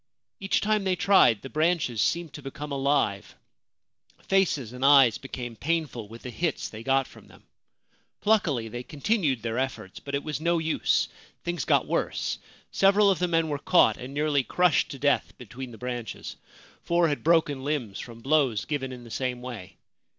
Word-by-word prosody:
Each 195 0 0
time 215 0 +1
they 190 -1 +1
tried 180 - +4
the - - -5
branches 155 -8 +1
seemed 170 +2 0
to 145 - -8
become 140 +2 -7
alive; 135 -8 0 0.9
faces 160 - +1
and 125 +1 -6
eyes 135 -5 +6
became 125 -3 -7
painful 145 -6 -2
with 115 +2 -12
the 125 - -6
hits 165 +4 -2
they 110 - -9
got 135 +2 +2
from - - -16
them. - - -19 0.8
Pluckily 165 - +1
they 120 +2 -6
continued 150 - -1
their 115 +1 -2
efforts; 130 -7 -4
but 140 0 -5
it 140 - -2
was 155 0 -4
no 170 +1 +2
use. 160 -1 +1 0.4
Things 175 0 -3
got - - +3
worse. - - -2 0.3
Several 200 +1 +4
of 190 - -1
the 180 - +1
men 165 -1 +1
were 145 -2 -2
caught 180 +3 +4
and 125 +2 -8
nearly 145 -1 +1
crushed 180 +4 +2
to 140 - -7
death 140 +1 0
between 125 +2 -8
the 115 - -11
branches; 120 -3 -6 0.5
four 170 0 +2
had 145 -2 -2
broken 155 -5 +2
limbs 130 -9 -2
from 115 -1 -9
blows 135 -6 +2
given 135 -3 -3
in 125 -1 -9
the 115 - -12
same 125 0 -2
way. 110 -7 -8
140 Hz, 180 wpm, -27 LUFS, 125-165 Hz, 0.9 s, eyes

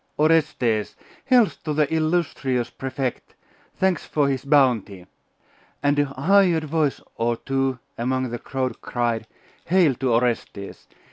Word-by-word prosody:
Orestes! 150 -9 +1 0.3
Health 250 -5 +3
to 150 -2 -2
the 150 0 +1
illustrious 155 -6 0
Prefect! 130 -1 -4 0.4
Thanks 190 -4 +1
for 145 -2 0
his 135 -2 -2
bounty!' 120 -10 +2 0.8
And 145 0 +2
a 145 - +3
hired 165 +5 +3
voice 155 -2 0 0.2
or 115 0 0
two 135 0 -1 0.2
among 130 +1 -1
the 120 - -4
crowd 130 -2 -3
cried, 120 -2 -2 0.4
'Hail 175 -5 +4
to 130 -2 0
Orestes! 115 -4 -2
135 Hz, 125 wpm, -23 LUFS, 120-155 Hz, 0.8 s, Hail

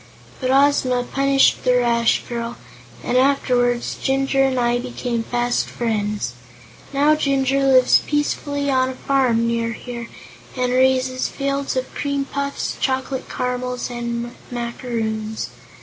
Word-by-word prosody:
But 255 - -1
Ozma 265 -2 +3
punished 275 +1 +2
the 250 -1 +3
rash 235 -1 +2
girl, 235 0 -4 0.5
and - - -1
afterward 250 -3 +2 0.2
Jinjur 270 0 +1
and 265 -1 +1
I 240 0 +2
became 245 -1 -3
fast 240 +1 0
friends. 210 - -2 0.6
Now 285 +2 +4
Jinjur 275 -2 +1
lives 255 -1 +6
peacefully 290 -1 -1
on 260 -1 +2
a 260 - -6
farm, 255 -4 +1
near 230 0 0
here, 235 0 -7 0.5
and 250 0 0
raises 255 0 +2
fields 275 0 -2
of 255 0 -3
cream 280 -1 -2
puffs, 280 0 -3
chocolate 260 0 -2
caramels 250 0 -3
and 235 0 -4 0.2
macaroons. 230 -3 -3
255 Hz, 125 wpm, -21 LUFS, 240-270 Hz, 0.6 s, lives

